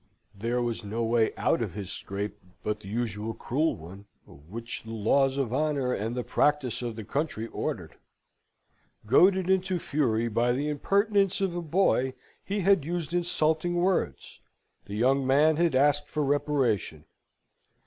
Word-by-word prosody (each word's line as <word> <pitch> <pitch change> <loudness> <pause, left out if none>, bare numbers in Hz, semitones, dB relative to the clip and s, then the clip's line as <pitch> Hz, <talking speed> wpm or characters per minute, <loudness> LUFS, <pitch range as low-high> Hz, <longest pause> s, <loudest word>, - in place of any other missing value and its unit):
There 115 +4 -1
was 120 -2 -3
no 110 +3 -3
way 115 -1 +2
out - - +1
of 105 -6 -3
his 100 -3 -5
scrape, 100 +2 -5 0.2
but 105 0 -2
the 100 - -12
usual 110 0 -3
cruel 155 +6 0
one, 95 +6 -11 0.2
which 110 +12 -7
the 110 - -12
laws 130 +5 +2
of 130 -4 -1
honour 140 -3 0
and 110 +4 -2
the 125 - -2
practice 145 -4 +1
of 120 -2 -4
the 110 - -6
country 140 -2 -2
ordered. - - -5 1.1
Goaded 185 - +4
into 190 -1 +1
fury 120 -8 0
by 120 +2 +1
the 145 +4 -1
impertinence 200 +5 +2
of 190 -3 -1
a 175 - -2
boy, 155 -6 +1 0.3
he 200 +1 -2
had 195 -4 +4
used 170 +1 -3
insulting 175 -1 +1
words. 175 - -1 0.5
The 100 - -6
young 130 +4 +2
man 150 +3 +4
had 170 -4 +2
asked 145 +2 +3
for 150 0 -2
reparation. 135 - 0
130 Hz, 155 wpm, -28 LUFS, 110-160 Hz, 1.1 s, Goaded